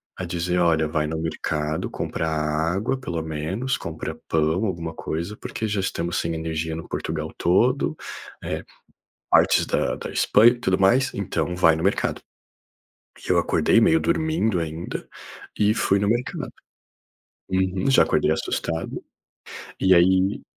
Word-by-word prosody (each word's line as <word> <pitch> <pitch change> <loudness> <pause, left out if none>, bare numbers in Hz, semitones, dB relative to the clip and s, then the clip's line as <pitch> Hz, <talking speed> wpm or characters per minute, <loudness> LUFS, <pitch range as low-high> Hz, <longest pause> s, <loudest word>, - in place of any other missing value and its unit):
a - - -6
dizer: 90 0 -1
"Olha, 80 -3 +3
vai 75 -1 0
no 80 +1 -3
mercado 80 -1 -2
comprar 80 - -3
água, 80 - 0
pelo 85 -11 -4
menos. 80 - -2
Compra - - -5
pão, 80 +4 +1
alguma 85 -4 -3
coisa, 85 +8 -4
porque 110 - -4
já 105 -2 -1
estamos 85 -2 -2
sem 85 - -1
energia 80 0 -3
no 80 - -8
Portugal 80 0 -4
todo, 125 - +2 0.4
eh, - - -4 0.7
partes - - +4
da - - 0
da - - -6
Espanha 115 +3 +5
e - - -4
tudo 95 -5 +1
mais. 125 +8 +3
Então, 90 -3 -2
vai 80 -3 +5
no 80 - -4
mercado". 95 +3 0 1.1
E - - -7
eu - - +4
acordei 115 - +3
meio 160 +8 +5
dormindo 160 - +1
ainda 80 +1 -5 0.5
e 105 0 +4
fui 100 -3 +2
no 100 - 0
mercado. 120 +4 -1 1.0
Uhum. 95 +5 0
Já 130 - +6
acordei - - +1
assustado. 80 0 -3 0.8
E 95 0 +5
aí 95 +3 +3
90 Hz, 145 wpm, -23 LUFS, 80-105 Hz, 1.1 s, Já